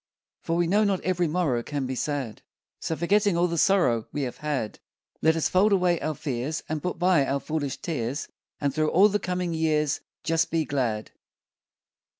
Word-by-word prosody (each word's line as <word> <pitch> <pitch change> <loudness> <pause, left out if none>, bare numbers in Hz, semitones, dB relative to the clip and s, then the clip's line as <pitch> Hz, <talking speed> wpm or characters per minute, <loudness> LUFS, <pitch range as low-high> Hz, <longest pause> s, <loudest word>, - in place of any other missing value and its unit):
For, 165 - -1
we 175 0 +2
know, 205 +5 +3
not 200 -3 +1
every 180 -1 0
morrow 150 -7 0
Can 140 +2 -3
be 130 - -3
sad; 135 -3 -3 0.4
So, 160 - -2
forgetting 200 +2 +2
all 175 - +3
the 170 -1 -1
sorrow 140 - +3
We 145 - -2
have 125 - -4
had, 145 -8 -3 0.4
Let 160 0 +4
us 165 - +1
fold 195 +3 +3
away 180 -3 +2
our 155 0 -2
fears, 140 +2 -3
And 155 -1 -3
put 180 +2 -3
by 175 -4 +4
our 140 +1 0
foolish 145 -2 -3
tears, 140 -4 -3 0.3
And 140 -2 0
through 155 +1 +1
all 195 +5 +6
the 205 0 0
coming 180 -2 -2
years 155 -3 +1 0.2
Just 165 0 +1
be 165 -2 0
glad. 120 -7 -2
160 Hz, 185 wpm, -26 LUFS, 140-180 Hz, 0.4 s, all